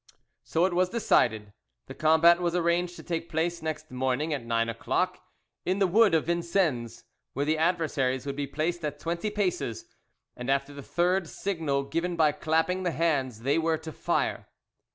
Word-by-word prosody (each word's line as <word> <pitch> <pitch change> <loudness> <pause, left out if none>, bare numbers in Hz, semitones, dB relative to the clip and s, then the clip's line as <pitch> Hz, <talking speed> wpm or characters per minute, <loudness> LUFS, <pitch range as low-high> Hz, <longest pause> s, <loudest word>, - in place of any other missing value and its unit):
So 165 +2 +1
it 185 - 0
was 180 +1 +2
decided. 110 - +1 0.3
The 135 - -9
combat 160 +4 +5
was 175 0 0
arranged 175 0 +1
to - - -10
take 170 -1 -3
place 170 +1 -1
next 155 0 -5
morning 130 +4 -1
at 140 -5 -3
nine 115 0 0
o'clock, 115 0 -1 0.4
in 185 +2 0
the 200 - +3
wood 200 0 +4
of 160 - +1
Vincennes, 165 - 0 0.3
where 140 +2 -1
the 155 +1 +1
adversaries 150 -6 0
would 140 -1 -3
be 145 0 -3
placed 160 +4 -2
at 145 -1 -3
twenty 170 +7 -2
paces, 180 - -2 0.5
and 125 +1 -6
after 140 +1 0
the 140 - -8
third 175 +3 0
signal 160 -8 -1
given 165 +5 -2
by 155 -2 +4
clapping 160 +5 0
the 180 - 0
hands 145 -8 0
they 140 +6 +2
were 165 0 +1
to 160 0 -8
fire. - - -1
160 Hz, 175 wpm, -28 LUFS, 140-175 Hz, 0.5 s, combat